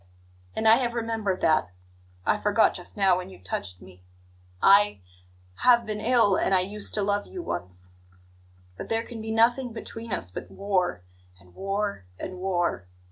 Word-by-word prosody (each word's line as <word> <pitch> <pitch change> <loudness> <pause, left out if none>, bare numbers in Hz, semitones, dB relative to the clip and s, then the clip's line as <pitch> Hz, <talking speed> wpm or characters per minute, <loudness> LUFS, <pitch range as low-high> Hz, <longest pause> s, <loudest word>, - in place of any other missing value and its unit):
And 220 - +1
I 225 +1 +8
have 240 -2 -1
remembered 225 -5 -2
that. 155 - +3 0.6
I - - +2
forgot - - +3
just - - -7
now 195 -2 +4
when 185 0 -6
you 190 - -12
touched 90 0 -5
me; 90 -1 -15 0.6
I 200 - +5 0.6
have 240 -2 +5
been 215 -1 -4
ill, 230 -4 +3
and 190 - +2
I 185 - +4
used 205 +3 -2
to 210 - +1
love 205 0 0
you 360 -2 -7
once. 90 - -5 0.8
But - - -7
there 225 0 +1
can 230 -2 -8
be 220 - -6
nothing 235 +2 +2
between 225 0 -7
us 90 - -1
but - - -7
war, 190 - -1 0.4
and 90 -2 -21
war, 195 - -3
and 185 - -6
war. 175 - -1
200 Hz, 170 wpm, -26 LUFS, 180-225 Hz, 0.8 s, I